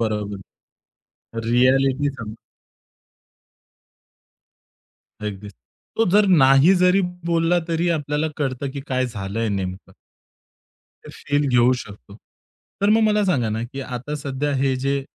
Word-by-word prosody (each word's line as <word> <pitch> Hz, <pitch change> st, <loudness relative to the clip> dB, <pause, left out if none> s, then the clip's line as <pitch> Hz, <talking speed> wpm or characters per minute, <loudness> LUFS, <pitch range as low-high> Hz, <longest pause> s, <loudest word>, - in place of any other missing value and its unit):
बरोबर. 105 Hz, -3 st, -2 dB, 1.1 s
रिॲलिटी 135 Hz, +3 st, +3 dB
सांग. 110 Hz, -3 st, -7 dB, 2.9 s
अगदीच 105 Hz, -1 st, -6 dB, 0.4 s
तो 225 Hz, -, +3 dB
जर 205 Hz, +1 st, +4 dB, 0.2 s
नाही 135 Hz, +8 st, +6 dB
जरी 180 Hz, +2 st, +4 dB, 0.3 s
बोलला 165 Hz, +1 st, +2 dB
तरी 170 Hz, +1 st, 0 dB
आपल्याला 150 Hz, +1 st, -2 dB
कळतं 135 Hz, -2 st, -3 dB
की 140 Hz, 0 st, -6 dB
काय 130 Hz, -1 st, 0 dB
झालंय 110 Hz, 0 st, -4 dB
नेमकं. 95 Hz, -2 st, -4 dB, 1.1 s
ते -, -, -10 dB
फील 145 Hz, 0 st, -1 dB
घेऊ 125 Hz, 0 st, +4 dB
शकतो. 100 Hz, -, -11 dB, 0.6 s
तर 200 Hz, -, +2 dB
मग 225 Hz, -, +4 dB
मला 210 Hz, -1 st, +2 dB
सांगा 130 Hz, -, +1 dB
ना 110 Hz, +2 st, -2 dB
की 135 Hz, +3 st, -7 dB
आता 130 Hz, +3 st, -5 dB
सध्या 140 Hz, 0 st, -3 dB
हे 135 Hz, 0 st, +1 dB
जे 135 Hz, +1 st, -1 dB
135 Hz, 120 wpm, -21 LUFS, 115-150 Hz, 2.9 s, नाही